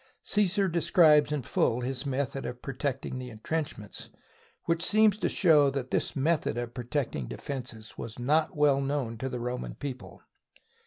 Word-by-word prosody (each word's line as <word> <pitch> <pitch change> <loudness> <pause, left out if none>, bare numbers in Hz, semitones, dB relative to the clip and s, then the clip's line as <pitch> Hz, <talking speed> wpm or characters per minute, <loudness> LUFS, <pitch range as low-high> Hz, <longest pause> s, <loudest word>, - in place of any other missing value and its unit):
Csesar 200 -1 +2
describes 160 -4 +4
in 150 -3 -1
full 115 +1 +1
his 130 +2 -3
method 135 0 -2
of 125 0 -6
protecting 135 -1 -3
the 125 -1 -6
intrenchments 110 - -5 0.6
which 165 0 0
seems 215 +1 +4
to - - 0
show 150 -6 +5
that 135 -2 -4
this - - 0
method 150 -3 0
of 120 -1 -4
protecting 125 - -3
de - - -7
fences 120 -5 -7
was 110 - -7
not 150 +6 +1
well 145 -2 +4
known 135 -4 -2
to 130 - -3
the 125 -1 -4
Roman 125 +1 -4
people. 125 -11 -7
135 Hz, 160 wpm, -29 LUFS, 125-150 Hz, 0.6 s, show